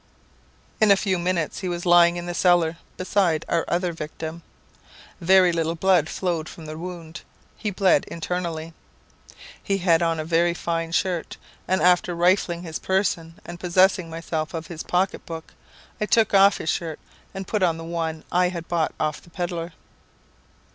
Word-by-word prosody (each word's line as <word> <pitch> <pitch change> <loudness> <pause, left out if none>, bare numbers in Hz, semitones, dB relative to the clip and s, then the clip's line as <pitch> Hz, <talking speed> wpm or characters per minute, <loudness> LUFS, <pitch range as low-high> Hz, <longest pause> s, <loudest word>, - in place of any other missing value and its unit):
"In 215 -2 +5
a 200 - +8
few 190 -2 0
minutes 170 -3 -1
he 185 - -3
was 175 0 -4
lying 175 0 +6
in 175 - -5
the 175 - -4
cellar, 175 -2 +3 0.2
beside 185 -4 +1
our 170 -1 +1
other 175 0 0
victim. 160 +1 -6 0.8
Very 185 +1 +5
little 165 0 -1
blood 175 -2 +3
flowed 175 -3 -2
from 165 - -11
the 155 0 -7
wound; 170 -1 -8 0.3
he 215 - -3
bled 190 -1 +3
internally. 165 -1 -4 0.9
He 195 - 0
had 175 -3 +3
on 165 -1 +1
a 155 - -3
very 170 +1 +2
fine 165 -1 -2
shirt; 175 -1 -1 0.3
and 185 +1 +1
after 180 0 +3
rifling 175 0 +2
his 160 -2 -5
person, 175 -4 -1
and 175 0 -8
possessing 185 0 +3
myself 160 -1 -4
of 165 0 -4
his 165 -2 -7
pocketbook, 175 -3 -2 0.5
I 210 - 0
took 225 -2 +3
off 195 0 +6
his 160 - -1
shirt, 160 -3 -4 0.4
and 195 -1 -5
put 210 - -1
on 170 -3 +2
the 165 - -7
one 165 -1 -3
I 180 0 +3
had 170 -2 -6
bought 165 -2 0
of 155 -1 -1
the - - -19
pedlar." 170 -1 -4
175 Hz, 170 wpm, -24 LUFS, 165-185 Hz, 0.9 s, a